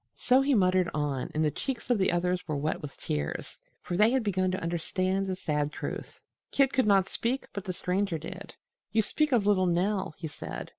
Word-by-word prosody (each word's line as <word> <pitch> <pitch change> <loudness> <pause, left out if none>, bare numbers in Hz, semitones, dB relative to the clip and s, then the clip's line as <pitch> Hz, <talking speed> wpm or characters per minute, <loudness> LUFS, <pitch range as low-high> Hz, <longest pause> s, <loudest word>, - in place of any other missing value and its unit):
So 255 +2 +4
he 275 0 +3
muttered 185 -3 +3
on, 145 -3 -1
and 155 +1 +2
the 150 - +2
cheeks 260 - -3
of 235 - +3
the 190 - +3
others 180 +1 +1
were 155 -2 -1
wet 150 +3 -1
with 145 -3 -8
tears, 75 -1 -3 0.2
for 175 - -3
they 210 +4 +5
had 260 0 +1
begun 185 -3 +1
to 185 +1 -1
understand 185 +3 -1
the 190 - -1
sad 150 -4 -1
truth. - - -6 0.3
Kit 275 -1 +3
could 260 -4 +3
not 195 -2 +4
speak, 245 +6 -2
but 200 -1 -5
the 185 - -2
Stranger 180 0 -1
did: 185 +4 -8 0.4
"You 220 +1 +3
speak 305 +7 0
of 230 -5 +3
little 190 -3 +3
Nell," 185 0 0
he 165 - -5
said. 145 - -7
185 Hz, 210 wpm, -29 LUFS, 170-210 Hz, 0.4 s, they